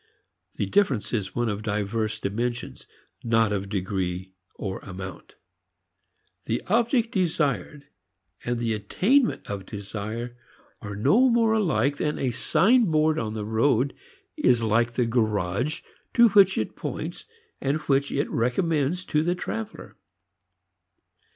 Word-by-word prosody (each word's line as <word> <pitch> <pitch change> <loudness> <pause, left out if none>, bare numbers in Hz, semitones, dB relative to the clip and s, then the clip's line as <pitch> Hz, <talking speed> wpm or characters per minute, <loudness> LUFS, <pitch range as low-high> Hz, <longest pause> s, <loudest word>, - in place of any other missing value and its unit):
The - - -1
difference 145 - +1
is 100 -5 -2
one 120 0 0
of 105 -1 -2
diverse 110 +1 -2
dimensions, 120 - -3 0.4
not 115 -2 +2
of 100 -1 -3
degree 95 -2 -3 0.2
or 95 -2 -4
amount. 95 -2 -9 1.1
The - - -2
object 235 +2 +2
desired 150 - -1 0.6
and 120 0 -1
the 115 -1 -1
attainment 205 - +1
of 100 -2 -5
desire 110 +3 -5 0.5
are 105 -2 -6
no 205 - +4
more 230 -2 +3
alike 145 - +1
than 150 - -1
a 130 - 0
signboard 160 - +3
on 110 -1 -3
the 105 -1 -3
road 115 +4 +2 0.4
is 120 -2 +3
like 115 +2 +2
the 125 0 +1
garage 110 +2 0 0.3
to 235 -1 +7
which 195 -2 +5
it - - -2
points - - -5 0.4
and 140 +2 +1
which 140 0 +1
it 140 - 0
recommends 155 +7 0
to 150 - +1
the 175 +3 0
traveler. 220 +4 -6
120 Hz, 125 wpm, -25 LUFS, 105-165 Hz, 1.1 s, to